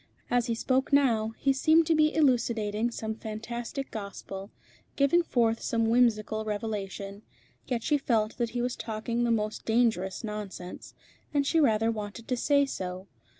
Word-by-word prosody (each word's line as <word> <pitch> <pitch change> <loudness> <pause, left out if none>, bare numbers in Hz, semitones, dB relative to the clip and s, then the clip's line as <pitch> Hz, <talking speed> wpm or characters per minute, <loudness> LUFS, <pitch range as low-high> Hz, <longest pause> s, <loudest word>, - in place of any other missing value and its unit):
As 245 0 +2
he 230 - 0
spoke 260 +4 0
now, 230 -6 +3
he 275 - +2
seemed 315 +4 +4
to 325 - +3
be 305 -1 +4
elucidating 235 -6 +2
some 220 -2 -4
fantastic 230 +5 -5
gospel, 200 -1 -7 0.5
giving 280 +5 +4
forth 230 -8 +1
some 230 -1 +1
whimsical 220 -3 +2
revelation; 205 -2 -4 0.5
yet 240 -3 -1
she 295 -1 +2
felt 225 -5 0
that 235 -1 +1
he 240 +1 -2
was 245 0 -1
talking 230 +2 -2
the - - +1
most 215 -2 -1
dangerous 220 -4 +1
nonsense, 210 -4 -7 0.4
and 285 -1 +3
she 325 +3 +2
rather 225 -5 +3
wanted 215 +1 -6
to 250 - +2
say 280 +3 +3
so. 185 -7 -5
230 Hz, 155 wpm, -28 LUFS, 215-255 Hz, 0.5 s, seemed